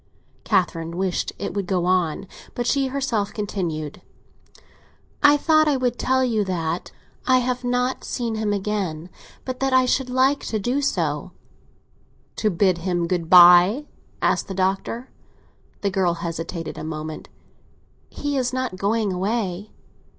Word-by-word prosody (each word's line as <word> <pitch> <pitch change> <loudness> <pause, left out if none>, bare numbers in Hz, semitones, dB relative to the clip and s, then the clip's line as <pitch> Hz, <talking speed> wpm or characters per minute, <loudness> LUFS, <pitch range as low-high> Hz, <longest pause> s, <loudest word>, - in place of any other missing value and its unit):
Catherine 170 -4 0
wished 185 -1 -1
it - - -4
would 200 -2 -3
go 180 -2 0
on, 180 -3 +1 0.3
but 240 - -2
she 275 +2 +1
herself 255 -6 -1
continued. 170 -8 -4 1.2
"I 290 0 +6
thought 310 +1 +3
I 290 -2 +2
would 245 -2 -1
tell 260 0 +2
you 225 -4 +1
that 170 -2 -3 0.4
I 260 -1 +5
have 250 0 -1
not 250 +1 -1
seen 235 -2 -3
him 215 -1 -1
again, 190 -5 -3 0.3
but 255 -1 -4
that 270 -1 0
I 260 0 +5
should 255 0 0
like 260 +3 +3
to 220 - -2
do 245 +7 -1
so." 170 - -1 1.0
"To 215 - +1
bid 185 -1 +2
him 175 -1 -1
good 170 -2 -2
bye?" 180 +9 +7 0.4
asked - - +1
the 195 - -5
Doctor. 195 +6 -2 0.7
The 200 - 0
girl 185 -3 +1
hesitated 165 0 -5
a - - -6
moment. 155 0 -6 0.8
"He 290 -1 -3
is 250 -2 0
not 255 -7 -3
going 205 +1 0
away." 195 0 -2
200 Hz, 145 wpm, -23 LUFS, 175-250 Hz, 1.2 s, bye